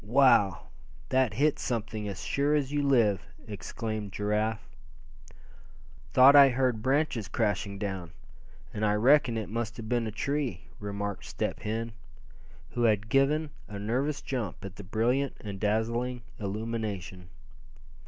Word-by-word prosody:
"Wow! 105 - +4 0.4
that 130 -6 +2
hit 150 +4 +2
something, 110 -3 -3
as 100 -2 -5
sure 145 +2 +1
as 140 -2 0
you 145 0 +1
live!" 115 -9 +3 0.2
exclaimed 110 0 -5
Giraffe. 105 +2 -1 1.4
"Thought 130 - +8
I 140 -1 +9
heard 125 -3 0
branches 130 -3 +1
crashing 105 -3 -1
down, 95 -4 -4 0.6
and 110 - -3
I 105 -1 +3
reckon 125 +1 +4
it 110 - -3
must 115 +1 -3
have 115 -2 -7
been 120 -1 0
a - - -3
tree," 130 - -2 0.2
remarked 100 0 -4
Step - - -3
Hen, 115 +2 -3 0.8
who 120 - -3
had 105 -1 +2
given 145 +4 +2 0.2
a 105 - -7
nervous 130 +8 -1
jump 120 -8 -4
at 100 - -9
the 100 - -8
brilliant 120 +7 0
and 100 -3 -7
dazzling 115 +4 -1 0.2
illumination. 100 -4 -4
110 Hz, 135 wpm, -29 LUFS, 105-130 Hz, 1.4 s, I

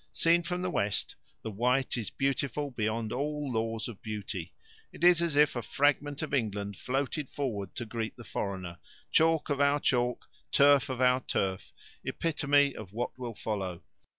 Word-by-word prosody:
Seen 170 +1 +4
from 180 +1 -3
the 185 - -1
west, 100 - 0 0.3
the 110 - -4
Wight 125 +5 +1
is 115 -5 -2
beautiful 140 +1 -1
beyond 110 -1 -1
all 145 +1 -2
laws 115 0 -1
of 115 -5 -9
beauty. 100 -5 -5 0.4
It - - -10
is 175 -1 +7
as 170 -4 0
if 150 -1 +5
a 120 - -1
fragment 145 +3 +1
of 150 - -5
England 100 -5 -1
floated 135 +2 -2
forward 110 -9 -3
to 120 - -3
greet 110 0 -4
the 120 - -9
foreigner 95 -6 -4 0.3
chalk 160 -1 +3
of 140 0 +1
our 140 +1 +4
chalk, 125 -3 +1 0.2
turf 140 -1 +5
of 130 -1 -3
our 125 0 +5
turf, 95 -6 -2 0.3
epitome 145 -3 +2
of 100 -3 -9
what 120 +3 -3
will 120 -3 -5
follow. 95 -6 -3
125 Hz, 170 wpm, -30 LUFS, 110-145 Hz, 0.4 s, is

